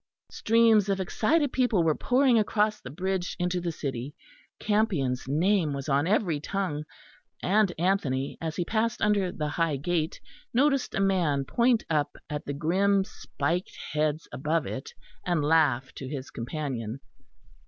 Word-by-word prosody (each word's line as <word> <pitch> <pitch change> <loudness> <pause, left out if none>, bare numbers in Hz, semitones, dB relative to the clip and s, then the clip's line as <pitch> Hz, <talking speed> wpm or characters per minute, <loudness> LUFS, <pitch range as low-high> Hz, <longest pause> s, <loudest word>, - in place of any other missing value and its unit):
Streams 225 -2 +4
of 195 -1 +1
excited 280 - +1
people 245 -9 +2
were 160 -1 +3
pouring 250 - +3
across 210 0 +1
the 125 - -8
bridge 185 +4 -2
into 180 0 -1
the 170 -1 -2
city; 135 -2 -5 0.4
Campion's 180 - 0
name 165 +2 +2
was 140 0 -5
on 140 +2 +2
every 185 -6 +1
tongue; 155 -3 -3 0.6
and 200 0 +3
Anthony, 150 -7 0
as 160 -1 -3
he 175 - -1
passed 230 +4 0
under 200 -3 +2
the 150 - -3
high 165 -1 0
gate, 160 +2 -1 0.4
noticed 275 0 +2
a - - 0
man 175 -8 +1
point 235 - +2
up 150 -2 0
at 150 0 -4
the 145 - -2
grim 190 +7 +2
spiked 170 -1 -3
heads 155 +1 0
above 155 +3 -1
it, 130 - -6 0.3
and 170 -5 0
laugh 145 -5 +2
to 135 - -7
his 135 -2 -6
companion. 120 -2 -4
170 Hz, 150 wpm, -27 LUFS, 145-205 Hz, 0.6 s, Streams